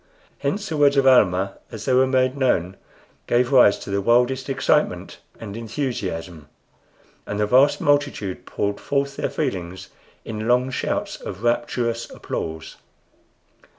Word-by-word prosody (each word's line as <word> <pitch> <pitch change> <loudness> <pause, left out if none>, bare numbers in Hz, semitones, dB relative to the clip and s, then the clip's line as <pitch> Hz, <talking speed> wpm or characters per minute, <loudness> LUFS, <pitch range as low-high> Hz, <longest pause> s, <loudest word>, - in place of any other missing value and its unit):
Hence 205 +1 -2
the 160 - -3
words 145 -1 +4
of 135 - +4
Almah, 100 -7 +3
as 110 -2 -7
they 130 - +1
were 130 +1 +4
made 130 0 +1
known, 95 -10 0 0.5
gave 120 +1 +2
rise 125 -7 +6
to - - -8
the 100 0 0
wildest 125 +5 +2
excitement 135 - 0 0.2
and 105 -3 -8
enthusiasm, 95 - -4 0.8
and 100 - -3
the 105 - +2
vast 130 +6 +4
multitude 145 -10 0
poured 100 0 -2
forth 140 0 -1
their - - -1
feelings 90 0 -4 0.4
in 110 0 -5
long 125 +2 +2
shouts - - -2
of 95 +5 -7
rapturous 120 0 -1
applause. 80 0 -6
120 Hz, 140 wpm, -22 LUFS, 100-130 Hz, 0.8 s, rise